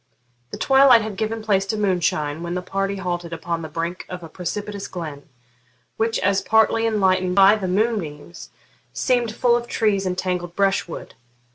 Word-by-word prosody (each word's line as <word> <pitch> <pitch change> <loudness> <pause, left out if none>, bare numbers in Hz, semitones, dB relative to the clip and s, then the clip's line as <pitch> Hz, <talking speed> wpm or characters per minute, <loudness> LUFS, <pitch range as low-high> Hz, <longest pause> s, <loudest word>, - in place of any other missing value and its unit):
The - - -7
twilight 270 -4 +6
had 215 -2 -5
given 220 +2 -3
place 195 -2 +1
to 215 - -2
moonshine 170 -6 0
when 170 +1 -4
the 180 - -3
party 195 +1 -2
halted 175 -3 -4
upon 165 0 -3
the 160 - -7
brink 170 +2 -4
of 180 -1 -7
a 165 - -9
precipitous 200 +4 -5
glen, 155 -5 -7 0.7
which, 225 0 0
as 200 0 +2
partly 220 +1 +3
enlightened 185 -4 +1
by 195 +1 +7
the 200 -3 -3
moonbeams, 180 -6 -2 0.4
seemed 245 -3 +1
full 240 -1 +3
of 240 0 -2
trees 200 -5 0
and 180 0 -2
tangled 180 -2 -3
brushwood. 195 -4 -1
195 Hz, 165 wpm, -22 LUFS, 175-215 Hz, 0.7 s, by